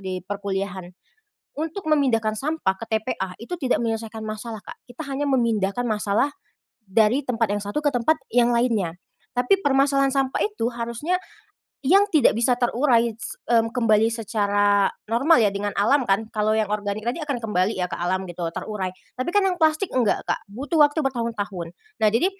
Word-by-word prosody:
di 185 -1 -3
perkuliahan. 195 -1 -3 0.7
Untuk 325 +4 -4
memindahkan 250 -8 +2
sampah 295 -9 0
ke - - -6
TPA, 210 -4 -2
itu 295 - -5
tidak 260 -5 +1
menyelesaikan 225 -1 -3
masalah, 215 +1 -5
Kak, - - -10
kita 245 - -7
hanya 280 +1 -2
memindahkan 235 -2 +1
masalah, 215 +4 +1 0.6
dari 215 +5 +3
tempat 230 -4 0
yang 205 - 0
satu 205 +9 -3
ke 290 - +3
tempat 245 +5 +2 0.2
yang 240 0 +3
lainnya. 220 -8 +1 0.4
Tapi 250 +11 +2
permasalahan 275 -2 +3
sampah 270 -1 0
itu, 215 +3 -1
harusnya 235 +10 -2 0.7
yang 390 +6 +6
tidak 310 -6 +5
bisa 240 +2 +2
terurai 235 -1 +2
s 225 - -8
mmm, 230 -1 +3
kembali 225 -2 +3
secara 205 -3 +2 0.2
normal 250 +8 +4
ya, 205 -2 +3
dengan 205 +1 -2
alam 260 +8 +4
kan, 200 +3 +2
kalau 215 0 +1
yang 220 -1 +1
organik 210 +1 -2
tadi 245 +8 -1
akan 285 -4 -2
kembali 210 -1 0
ya, 180 - 0
ke - - -3
alam 185 +2 0
gitu, 175 0 -7
terurai. 200 -4 -3 0.2
Tapi 255 +6 -2
kan 410 -1 +4
yang 370 -1 0
plastik, 315 +4 +2
enggak, 245 -5 +1
Kak, - - -1
butuh 285 +9 -1
waktu 295 +2 +3
bertahun-tahun. 220 -9 -3 0.3
Nah 215 - +6
jadi, 230 - +2
230 Hz, 170 wpm, -23 LUFS, 205-270 Hz, 0.7 s, yang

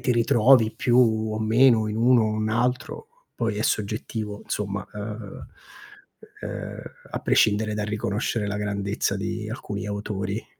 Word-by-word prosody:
ti 130 -3 +1
ritrovi 115 0 +4
più 125 -1 +2 0.3
o 110 - -2
meno 110 0 +4
in 105 - -3
uno, 120 0 +4
un 110 0 -1
altro, 125 - -1 0.3
poi 115 -3 -1
è 110 - 0
soggettivo 105 0 -2
insomma, 100 -2 -3
uhm 105 0 -7 0.9
uhm, - - -6 0.3
a - - -3
prescindere 105 0 +2
dal 105 -1 -2
riconoscere 105 0 -2
la 100 0 -2
grandezza 100 -1 -1
di 105 +2 -4
alcuni 105 -4 -5
autori. 100 0 -4
110 Hz, 135 wpm, -25 LUFS, 105-115 Hz, 0.9 s, ritrovi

